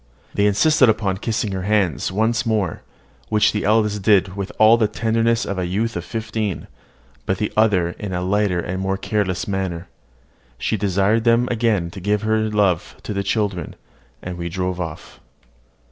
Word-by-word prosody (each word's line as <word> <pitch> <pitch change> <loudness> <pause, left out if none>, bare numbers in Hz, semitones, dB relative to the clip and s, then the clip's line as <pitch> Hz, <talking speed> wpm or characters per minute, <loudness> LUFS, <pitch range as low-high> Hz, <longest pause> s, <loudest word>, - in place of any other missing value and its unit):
They 100 0 +2
insisted 130 +5 +4
upon 100 -3 0
kissing 110 0 -2
her 95 -1 -3
hands 95 -7 0
once 110 +4 +1
more; 105 -7 -1 0.5
which 105 -1 +3
the 105 - -2
eldest 105 -1 +2
did 95 -2 +3
with 100 -1 -4
all 110 +1 +7
the 115 -2 +2
tenderness 115 +2 0
of 100 -1 -3
a 90 - -1
youth 110 +6 -1
of 85 - -3
fifteen, 110 -1 -3 0.6
but 95 - 0
the 105 - -2
other 100 -6 +3
in 100 +3 -6
a 90 -1 -2
lighter 100 -1 +1
and 90 +2 -3
more 95 0 -1
careless 100 +1 -1
manner. 95 -3 -3 0.7
She 110 - -1
desired 100 +2 +1
them 120 +1 +3
again 110 -7 0
to 95 - -8
give 105 +2 0
her 110 0 +2
love 100 -5 +1
to - - -4
the 100 - -1
children, 100 -4 -2 0.5
and 90 -1 -6
we 85 0 -3
drove 90 0 -2
off. 80 -3 -7
100 Hz, 175 wpm, -21 LUFS, 95-110 Hz, 0.7 s, all